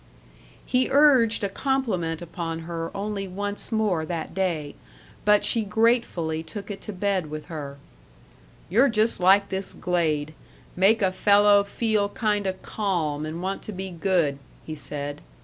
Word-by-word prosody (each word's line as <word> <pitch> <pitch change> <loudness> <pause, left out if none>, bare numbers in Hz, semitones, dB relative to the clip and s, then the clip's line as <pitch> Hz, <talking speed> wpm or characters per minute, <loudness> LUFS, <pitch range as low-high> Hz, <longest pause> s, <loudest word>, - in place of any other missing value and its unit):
He 255 0 +2
urged 260 -7 +4
a 200 - 0
compliment 195 - -1
upon 165 -1 -5
her 165 0 -4
only 200 -1 -3
once 205 +4 -4
more 210 -7 +1
that 160 0 -4
day; 170 -6 -1 0.5
but 210 0 +4
she 230 - +2
gratefully 210 -7 +1
took 200 +6 -8
it 195 - -7
to - - -6
bed 190 -4 -1
with 155 +3 -7
her: 145 -4 -6 0.9
"You're 235 +11 +4
just 225 0 +2
like 195 +2 +5
this 190 0 -3
glade 155 -4 -1 0.4
make 205 +4 +4
a 190 - +3
fellow 205 +1 +5
feel 210 0 0
kinda 205 -3 0
calm 160 -8 -2
and 165 +3 -5
want 195 +1 -2
to - - -6
be 190 -1 -6
good," 170 -5 0 0.3
he 155 - -5
said. 145 -1 -6
190 Hz, 150 wpm, -25 LUFS, 165-210 Hz, 0.9 s, like